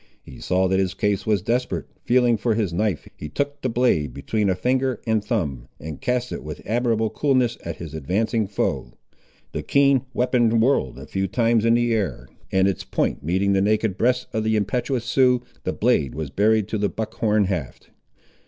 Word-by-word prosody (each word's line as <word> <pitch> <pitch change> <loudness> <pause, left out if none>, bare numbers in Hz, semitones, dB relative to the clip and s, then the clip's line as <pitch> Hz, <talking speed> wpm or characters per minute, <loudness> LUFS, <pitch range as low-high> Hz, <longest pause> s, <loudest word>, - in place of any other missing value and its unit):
He 65 - -12
saw 95 +1 +1
that 95 +1 +1
his 95 0 0
case 105 0 -1
was 105 -4 +2
desperate. 125 +3 -1 0.2
Feeling 120 -1 +4
for 110 +1 0
his 105 -6 -1
knife, 90 -5 -1
he 75 - -7
took 145 - -3
the 130 - -1
blade 115 - +1
between 105 -3 -1
a 95 - +2
finger 130 +6 0
and 110 -2 +1
thumb, 75 - -2
and 80 +6 -7
cast 125 -2 -1
it - - -5
with 75 0 -7
admirable 115 -1 0
coolness 130 -1 +1
at 85 -1 -5
his 80 -3 -8
advancing 100 +8 0
foe. 95 -10 -2 0.6
The - - -3
keen 140 -2 +3
weapon 120 -3 +2
whirled 110 - +1
a - - -9
few 95 0 -2
times 115 +3 +2
in 115 0 +4
the 120 -1 +2
air, 100 - -2 0.2
and 95 0 +3
its 95 - -1
point - - -1
meeting 95 +5 +1
the 95 - +3
naked 105 0 +1
breast 125 +4 +1
of 110 -1 0
the 110 0 +1
impetuous 120 +4 -1
Sioux, 125 0 +3 0.2
the - - 0
blade 70 -4 +1
was 75 -3 -4
buried 105 +4 +2
to 110 - -2
the 100 0 +1
buck 110 -1 -5
horn 105 -1 +2
haft. 90 -8 -4
110 Hz, 195 wpm, -23 LUFS, 95-120 Hz, 0.6 s, Feeling